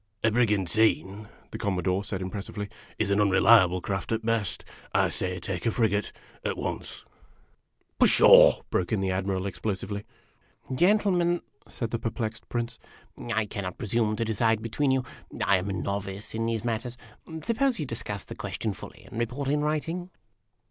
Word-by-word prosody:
" 105 - -38
A 110 - +4
brigantine," 105 -2 +2 0.2
the - - -6
Commodore 95 0 0
said 95 -2 -4
impressively, 100 +2 -5 0.2
" - - -24
is 105 -2 0
an 100 - +3
unre 100 -2 +4
liable 95 -6 +6
craft 100 +3 -3
at 110 0 -1
best. 115 -4 -1 0.3
I - - +4
say, 90 0 -3
take 95 +5 -3
a - - +5
frigate, 105 -3 +1 0.3
at - - -2
once." - - -5 0.4
" - - -43
Pshaw! - - +7
" - - -38
broke 90 - 0
in 110 - +2
the 95 -1 0
Admiral 95 0 -1
explosively. 100 +1 -3 0.4
" - - -12
Gentlemen," 175 +1 +3 0.2
said 115 -3 -4
the 115 - -1
perplexed 110 -1 -4
Prince, 115 -1 -3 0.3
" - - -11
I 110 0 +2
cannot 95 -3 -5
presume 110 0 0
to 115 - -1
decide 110 0 +1
between 135 +5 0
you. 130 -1 +2 0.4
I 100 - +5
am 95 +2 -3
a - - -1
novice 100 +1 -4
in 115 +1 -1
these 115 -1 -2
matters. 120 +1 -2 0.5
Suppose 245 - +1
you 150 - -1
discuss 105 -5 -4
the - - -8
question - - -3
fully, - - -11
and 115 - -7
report 125 +4 -2
in 145 +1 +2
writing?" 165 +4 -2
110 Hz, 175 wpm, -27 LUFS, 100-120 Hz, 0.5 s, Pshaw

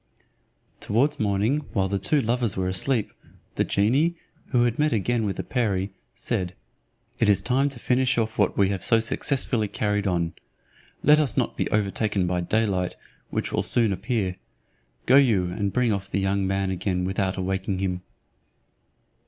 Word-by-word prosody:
Towards 125 +8 +1
morning, 105 +7 +1
while 95 -3 +1
the 100 +1 -1
two 145 +4 +2
lovers 115 -3 0
were 95 -1 0
asleep, 105 +5 -1 0.4
the - - +1
genie, 135 +12 +2 0.3
who 120 -2 +2
had 120 +1 0
met 150 +1 +3
again 110 +1 0
with 95 - -2
the - - -4
perie, 100 -6 -1 0.2
said, 90 -1 -2 0.6
"It 110 - +3
is 100 - +5
time 135 +3 +2
to 135 - -10
finish 125 +2 +1
what 110 -3 0
we 100 -1 +4
have 95 -3 -3
so 115 - +4
successfully 115 -1 0
carried 105 0 -1
on; 85 -3 0 0.7
let 150 +1 +6
us 145 -7 0
not - - 0
be - - -1
overtaken 105 -1 0
by 90 0 0
day 110 +6 +1
light, 90 -3 -1 0.3
which - - -2
will - - +1
soon 115 -4 +2
appear; 95 -1 -2 0.7
go 130 - +6
you 105 -10 +3
and 100 +2 -2
bring 125 -1 +2
off 100 0 -4
the - - -1
young 95 0 0
man 95 0 0
again 90 0 -1
without 95 0 -1
awaking 95 +1 -2
him." 90 -1 -2
105 Hz, 170 wpm, -25 LUFS, 95-120 Hz, 0.7 s, let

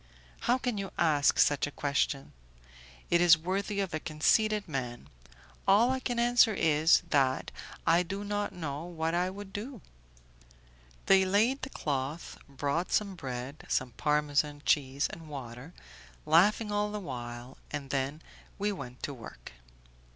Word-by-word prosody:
"How 245 - +2
can 245 -5 -2
you 195 -1 -4
ask 150 -4 +3
such 145 0 +3
a - - -7
question? 140 -1 -1 0.8
It 170 - +4
is 170 -2 +7
worthy 195 +5 -2
of 190 -5 -3
a 155 - -1
conceited 210 +8 +1
man. 125 - -5 0.6
All 220 +6 +5
I 260 - 0
can 245 -2 -3
answer 235 -2 +4
is, 160 +1 +4
that 135 -3 +2 0.3
I 170 +1 +5
do 195 +3 -4
not 205 0 -2
know 150 -4 -5
what 165 -2 -2
I 180 +1 +1
would 195 0 -9
do." 235 +4 -6 1.3
They 195 0 +6
laid 215 +8 +2
the 260 - -5
cloth, 145 - -4
brought 140 +5 -2
some 200 -2 +1
bread, 135 -3 -6
some 130 -1 0
Parmesan 150 +2 0
cheese 140 -1 +2
and 160 -1 -10
water, 130 +1 -8 0.5
laughing 205 +7 +4
all 205 0 0
the 210 - -3
while, 120 -6 -7
and 140 -3 -5
then 140 +3 -2 0.3
we 205 +1 0
went 125 -10 -8
to 145 - -3
work. 115 -4 -11
160 Hz, 150 wpm, -30 LUFS, 140-200 Hz, 1.3 s, is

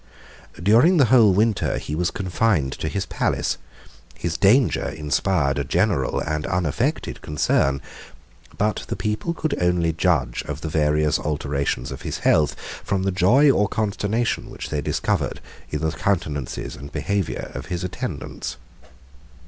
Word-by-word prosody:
During 115 - +5
the 140 - +6
whole 115 -5 +7
winter 105 +2 +1
he 75 - -5
was 85 +3 +1
confined 90 -6 0
to - - -2
his 95 +3 -2
palace: - - -1 0.6
his 85 -2 -3
danger 115 +5 +3
inspired 75 -1 0
a - - 0
general - - +1
and 75 -1 -2
unaffected 90 -6 -1
concern; 70 -2 +1 0.7
but 105 +1 0
the - - -3
people 110 +11 -2
could 155 -2 -1
only 90 -2 +2
judge 75 -8 +1
of 75 +1 -5
the 80 - -3
various 75 0 +2
alterations 70 -4 -2
of 65 - -7
his - - -4
health, 75 -2 +3 0.3
from 95 -1 -1
the 95 - +1
joy 120 +11 +5
or 105 -5 +2
consternation 110 +2 -1
which - - -7
they 75 - -1
discovered - - -1 0.3
in 75 - -3
the 80 0 0
countenances 80 -8 -2
and 70 +3 -10
behavior 100 -4 -2
of - - -6
his 90 -1 -3
attendants. 90 -7 -5
90 Hz, 145 wpm, -23 LUFS, 75-105 Hz, 0.7 s, whole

